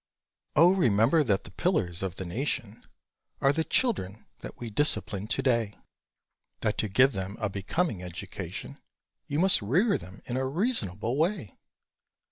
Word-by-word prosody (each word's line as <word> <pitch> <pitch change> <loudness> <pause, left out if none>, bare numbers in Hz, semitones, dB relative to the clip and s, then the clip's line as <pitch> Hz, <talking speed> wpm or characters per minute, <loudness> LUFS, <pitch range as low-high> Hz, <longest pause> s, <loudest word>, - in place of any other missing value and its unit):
Oh 170 +4 +6
remember 130 - +3
that 100 -6 +1
the - - -11
pillars 95 - 0
of 95 -3 -3
the 95 - -6
nation 115 +1 -3 0.5
Are 135 +1 +3
the 160 - 0
children 110 - 0
that - - -9
we 120 -2 -6
discipline 105 -5 0
to 125 - 0
day; 115 -5 +1 0.9
That 105 - -1
to 110 - 0
give 130 +7 +5
them 95 0 -4
a 110 -2 -1
becoming 100 - -2
education 90 -1 -7 0.5
You 145 -1 -2
must 185 -2 +5
rear 175 - +2
them 95 +2 -12
in 125 - -3
a 130 0 0
reasonable 135 - 0
way! 160 - -1
115 Hz, 150 wpm, -28 LUFS, 100-155 Hz, 0.9 s, Oh